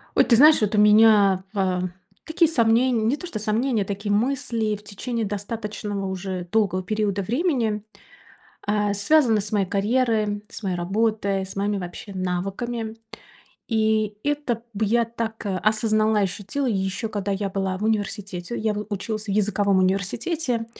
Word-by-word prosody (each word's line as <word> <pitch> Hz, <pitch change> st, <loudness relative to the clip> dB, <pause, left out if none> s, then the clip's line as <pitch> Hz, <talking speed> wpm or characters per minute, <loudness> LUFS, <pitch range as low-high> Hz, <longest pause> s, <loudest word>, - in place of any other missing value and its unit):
Ой, -, -, +6 dB
ты 235 Hz, -, +4 dB
знаешь, 300 Hz, +5 st, +7 dB
вот 210 Hz, 0 st, +1 dB
у -, -, +1 dB
меня, 210 Hz, -3 st, +6 dB
а, 185 Hz, -3 st, 0 dB, 0.4 s
такие 320 Hz, 0 st, +2 dB
сомнень 235 Hz, -3 st, +3 dB
не 260 Hz, -, +2 dB
то 355 Hz, -, -7 dB
что 215 Hz, -, -5 dB
сомнения, 220 Hz, +1 st, 0 dB
такие 205 Hz, +1 st, -3 dB
мысли 225 Hz, -1 st, 0 dB
в 210 Hz, -, -13 dB
течение 220 Hz, +3 st, -4 dB
достаточного 205 Hz, 0 st, -4 dB
уже 185 Hz, -1 st, -4 dB
долгого 200 Hz, -4 st, +1 dB
периода 205 Hz, 0 st, -1 dB
времени. 230 Hz, -, 0 dB, 0.8 s
А, 205 Hz, 0 st, +1 dB
связаны 225 Hz, +1 st, +3 dB
с 205 Hz, +1 st, -6 dB
моей 200 Hz, -2 st, +2 dB
карьерой, 210 Hz, 0 st, 0 dB
с 230 Hz, -, -9 dB
моей 190 Hz, -3 st, -1 dB
работой, 200 Hz, +1 st, 0 dB
с 190 Hz, -, -9 dB
моими 200 Hz, +1 st, 0 dB
вообще 180 Hz, +3 st, -7 dB
навыками. 195 Hz, +5 st, -3 dB, 0.7 s
И 215 Hz, -2 st, +1 dB
это 290 Hz, -6 st, -1 dB
б 215 Hz, +2 st, 0 dB
я 235 Hz, +3 st, +2 dB
так, 225 Hz, -1 st, -5 dB
а, 195 Hz, -2 st, -1 dB
осознала 215 Hz, 0 st, +2 dB
и 205 Hz, -, +3 dB
ощутила 200 Hz, +8 st, -2 dB
ещё 200 Hz, 0 st, -1 dB
когда 205 Hz, -2 st, -3 dB
я 195 Hz, 0 st, -1 dB
была 190 Hz, -1 st, -2 dB
в 200 Hz, -, -6 dB
университете. 205 Hz, -2 st, -2 dB
Я 215 Hz, 0 st, 0 dB
в 210 Hz, 0 st, -4 dB
училась 215 Hz, +1 st, -4 dB
в 205 Hz, -, -8 dB
языковом 200 Hz, -1 st, +2 dB
университете 225 Hz, -, -1 dB
210 Hz, 160 wpm, -23 LUFS, 200-225 Hz, 0.8 s, знаешь